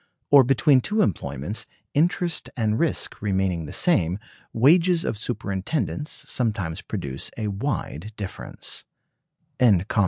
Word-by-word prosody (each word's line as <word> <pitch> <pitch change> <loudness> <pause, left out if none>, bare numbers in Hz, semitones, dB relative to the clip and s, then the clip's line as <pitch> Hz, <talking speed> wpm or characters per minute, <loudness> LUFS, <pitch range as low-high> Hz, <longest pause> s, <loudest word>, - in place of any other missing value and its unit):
Or 140 -2 +9
between 135 +1 +4
two 210 - +1
employments, 70 - -2 0.3
interest 170 +1 +1
and 110 -2 +1
risk 165 -4 0
remaining 95 -5 0
the - - -7
same, 90 - +2 0.3
wages 165 +8 +4
of - - -1
superintendence 115 +7 -2
sometimes 105 -7 -1
produce 70 -10 -4
a 110 -2 -2
wide 105 - -3
difference. 100 -3 -5
110 Hz, 105 wpm, -24 LUFS, 95-150 Hz, 0.3 s, Or